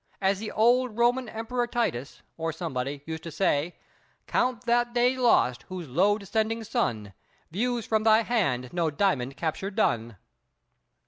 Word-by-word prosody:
As 195 0 +1
the 215 0 -5
old 240 +1 +2
Roman 240 +1 +2
Emperor 240 +2 -2
Titus, 145 - -2
or 165 0 -2
somebody, 140 -4 -4
used 160 0 -5
to 165 - -7
say: 160 -1 0 0.5
"Count 250 -2 0
that 240 0 +1
day 245 +2 +3
lost 235 - +3
whose 180 -3 -6
low 190 +10 +3
descending 220 +2 -1
sun 120 - -2 0.4
Views 235 +4 -1
from 220 -1 +1
thy 220 +1 +5
hand 140 - 0
no 170 -2 +1
diamond 140 -5 0
capture 165 +5 -2
done!" 120 - 0
200 Hz, 145 wpm, -27 LUFS, 150-235 Hz, 0.5 s, thy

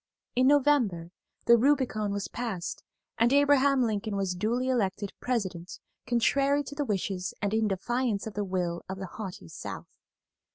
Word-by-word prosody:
In 255 +1 +4
November 255 -12 +3 0.3
the 235 0 +7
Rubicon 245 -6 +2
was 200 -1 -2
passed, 195 -6 -4 0.4
and 235 +2 +4
Abraham 280 -1 +4
Lincoln 215 -2 -1
was 195 -2 -1
duly 230 +8 -1
elected 205 -5 -1
President 190 -8 -3 0.3
contrary 275 +4 +2
to 285 - -8
the 290 0 -1
wishes 190 -3 -2
and 205 0 -1
in 220 0 +2
defiance 215 +2 -1
of 220 - -6
the 205 - -2
will 180 -3 -2
of 190 - -4
the 190 - -5
haughty 185 - -8
South. - - -8
215 Hz, 155 wpm, -28 LUFS, 190-255 Hz, 0.4 s, the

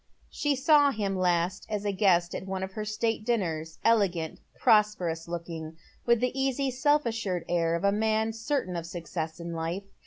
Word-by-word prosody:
She 290 -1 0
sawhiin 270 -8 +3
last 180 0 0
as 210 -1 -3
a 205 - +1
guest 185 -3 +2
atone 190 0 -4
of 190 - -4
her 215 +1 -5
state 215 +1 -1
dinners, 165 -9 -1
elegant, 185 -8 +2 0.2
prosperous 185 -7 +2
looking, 165 -2 -6 0.3
with 235 -1 +4
the 250 - +1
easy, 270 0 0
self 290 +3 +2
assured 210 -7 -2
air 170 -1 +1
of 170 - -3
a 200 - +4
man 220 +1 +1
ceilain 225 -4 -2
of 165 - -8
success 165 -1 -5
in 170 0 -5
life. 165 +4 -3
195 Hz, 165 wpm, -28 LUFS, 170-225 Hz, 0.3 s, with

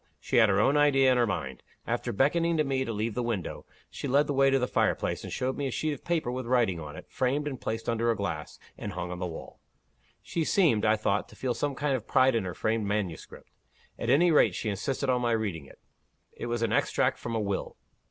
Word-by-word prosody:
She - - -1
had 110 -3 +6
her 95 0 +3
own 135 +7 +3
idea 135 -3 +5
in 125 - +3
her 120 - +3
mind. 65 -10 -4 0.2
After - - -2
beckoning 165 +8 +2
to 155 - +3
me 135 -2 0
to 115 - -3
leave 110 +1 -2
the 125 - -2
window, 115 -6 -4 0.2
she - - -5
led 140 +3 +3
the 145 - -2
way 135 0 +4
to 135 - +3
the 125 - +1
fire - - +1
place, - - -3
and - - -7
showed 130 0 -1
me 140 - -2
a - - -3
sheet 155 +4 -1
of 140 - -10
paper 165 -8 -1
with 125 -1 -4
writing 115 -8 +2
on 75 -1 -8
it, - - -10
framed 140 +3 -1
and 135 -4 -5
placed 115 +1 -4
under 115 0 +1
a 115 - +2
glass, 90 -7 -4 0.2
and - - -5
hung 90 0 -4
on 90 - -5
the 90 - -2
wall. 80 - -9 0.6
She 165 - -2
seemed, 150 - +3
I 110 0 +4
thought, 105 -1 -1
to - - -15
feel 130 -2 -1
some 145 +1 -2
kind 140 0 0
of 115 -4 -5
pride 130 0 +4
in 115 -4 0
her 90 -1 -5
framed 110 -1 -1
manuscript. 100 -6 -4 0.5
At 115 - -2
any 165 +7 +5
rate, 155 - +4
she 110 - -2
insisted 135 +7 -2
on 125 -1 +2
my 120 -1 +1
reading 100 -10 -2
it. - - -16 0.5
It - - -7
was 120 -1 -1
an 115 - 0
extract - - +1
from 115 - -4
a - - +1
will." 100 -2 -3
120 Hz, 250 wpm, -28 LUFS, 105-135 Hz, 0.6 s, had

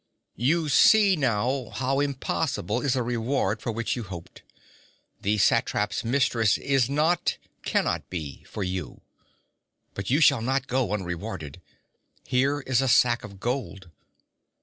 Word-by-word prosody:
'You 155 +6 +1
see 200 +7 +6
now 130 -2 0
how 135 +1 -1
impossible 140 -3 -1
is 140 -3 +1
the 125 - 0
reward 115 -2 -1
for 115 - -2
which 115 +1 -2
you 120 - -4
hoped. 95 -6 -9 0.8
The 105 +2 +1
satrap's 105 +1 +1
mistress 115 -3 +2
is 135 -3 +1
not 155 +5 +1 0.2
cannot - - -1
be 80 -6 -6
for 105 - -5
you. 90 0 -5 0.9
But 100 - -5
you 140 +5 +3
shall 140 -7 +5
not 130 +3 0
go 125 -6 -1
unrewarded. 90 -5 -5 0.6
Here 140 +3 +1
is 130 -2 +1
a 135 - 0
sack 120 -1 +4
of 100 -2 -11
gold.' 105 -7 -4
120 Hz, 135 wpm, -26 LUFS, 105-135 Hz, 0.9 s, see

